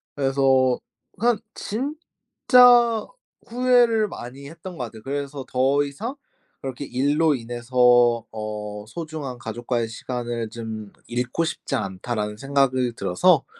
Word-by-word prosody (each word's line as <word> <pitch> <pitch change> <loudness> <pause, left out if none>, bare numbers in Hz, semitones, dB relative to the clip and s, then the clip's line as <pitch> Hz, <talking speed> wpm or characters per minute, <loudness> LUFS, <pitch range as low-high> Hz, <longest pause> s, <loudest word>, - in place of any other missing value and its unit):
그래서 135 -2 +3 0.4
한 235 -2 +2
진짜 245 -2 +3 0.4
후회를 240 -3 +3
많이 135 +4 -9
했던 170 +2 -9
거 125 - -3
같아요. 110 -1 -11
그래서 140 0 -4
더 135 +3 +2
이상 220 - -5 0.5
그렇게 135 +1 -5
'일로 145 +4 +2
인해서 120 0 +3
어 105 -1 -6
소중한 155 -3 -6
가족과의 120 +1 -2
시간을 120 -1 -4
좀 110 -3 -7 0.2
잃고 125 +7 -1
싶지 155 -3 -3
않다.'라는 105 0 -3
생각이 130 -2 +1
들어서 90 -2 +3
130 Hz, 250 characters per minute, -23 LUFS, 120-160 Hz, 0.5 s, 그래서